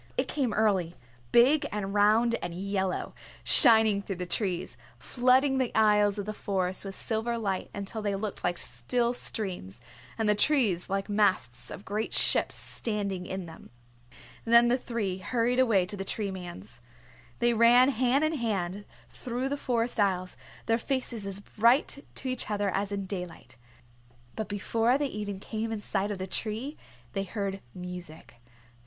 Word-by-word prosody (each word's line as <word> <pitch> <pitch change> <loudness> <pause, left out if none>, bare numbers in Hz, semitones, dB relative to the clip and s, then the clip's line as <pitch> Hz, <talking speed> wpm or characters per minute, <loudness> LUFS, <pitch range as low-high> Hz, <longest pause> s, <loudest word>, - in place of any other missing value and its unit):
It - - +1
came 265 -6 -1
early, 195 -5 +1 0.4
big 285 +5 +5
and 200 -2 -3
round 215 +3 +4
and 175 -1 -5
yellow, 190 0 -2 0.3
shining 220 -6 +6
through 195 -1 -5
the 180 0 -4
trees, 185 -1 -2 0.2
flooding 260 +2 +2
the 255 -2 0
aisles 210 -1 +4
of 200 - -3
the 215 - -4
Forest 190 -2 -2
with 195 -1 -6
silver 235 +1 -2
light 195 -4 -2
until 200 +2 -4
they 205 -1 -1
looked 200 0 -5
like 175 0 0
still 235 - 0
streams, 180 - -4 0.4
and 220 - 0
the 210 - +5
trees 210 - +2
like 195 0 -1
masts 195 - 0
of 200 - -9
great 215 +2 -2
ships - - +1
standing 200 -5 -3
in 190 -1 -4
them. 165 -1 -12 0.7
Then 235 +1 +6
the 250 - +3
three 210 -7 -3
hurried 245 +4 0
away 220 -8 +4
to 195 - -5
the 195 - -4
Tree 200 0 -3
Man's. 120 - -9 0.6
They 240 0 +3
ran 240 +3 +6
hand 260 +2 +2
in 310 +1 +1
hand 205 - -2 0.2
through 250 +2 -4
the 285 - -1
forest 240 -4 -1
aisles, 185 -3 +1 0.3
their 225 +1 +2
faces 240 -5 -3
as 195 0 -6
bright 240 +7 +2
to 265 - -4
each 255 -3 -1
other 205 -2 0
as 200 +1 -2
in 200 -1 -3
daylight. 180 -3 -7 0.8
But 220 - -3
before 225 +4 +1
they 290 - -1
even 205 -6 -4
came 220 +2 -4
in 220 - -3
sight 200 0 -2
of 205 - -3
the 185 - -4
tree 225 +9 -3 0.4
they 195 - -1
heard 195 -1 -4
music. 180 -8 -9
210 Hz, 165 wpm, -28 LUFS, 190-235 Hz, 0.8 s, shining